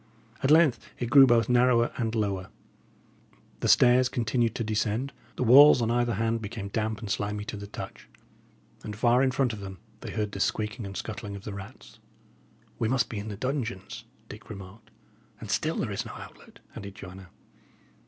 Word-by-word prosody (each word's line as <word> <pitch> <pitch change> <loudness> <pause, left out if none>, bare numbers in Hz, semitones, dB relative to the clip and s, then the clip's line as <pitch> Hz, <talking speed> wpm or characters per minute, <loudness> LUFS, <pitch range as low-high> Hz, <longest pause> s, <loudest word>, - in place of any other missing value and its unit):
At 135 - +1
length 155 -6 +5 0.2
it 120 -1 -4
grew 135 0 +8
both 120 -2 +3
narrower 120 -1 +3
and 115 -2 -2
lower; 100 -4 -2 1.1
the - - -1
stairs 125 +1 +5
continued 120 -1 0
to 115 - -2
descend; 110 +4 -1 0.2
the - - -1
walls 135 +4 +8
on 115 -1 0
either 120 -1 +1
hand 115 +2 -1
became 105 -1 -6
damp 110 +1 -2
and 110 - -7
slimy 105 0 -2
to 110 - -5
the 100 0 -8
touch; - - -9 0.7
and 105 - -6
far 120 +3 +3
in 135 - +3
front 130 -2 0
of 105 - -7
them 95 -1 -8 0.2
they - - -8
heard 105 -2 -2
the 100 - -6
squeaking 110 +2 -2
and 95 - -7
scuttling 105 -2 -6
of 100 - -9
the 105 - -6
rats. 100 -1 -11 0.8
"We 115 - +1
must 130 0 +1
be 110 - -4
in 100 - -7
the 105 -2 -6
dungeons," 120 -3 -4 0.2
Dick 110 - -12
remarked. 105 +2 -11 0.5
"And - - -6
still - - 0
there - - -2
is - - -2
no - - -9
outlet," - - -12 0.2
added 100 -1 -8
Joanna. 95 -2 -11
110 Hz, 185 wpm, -27 LUFS, 105-120 Hz, 1.1 s, grew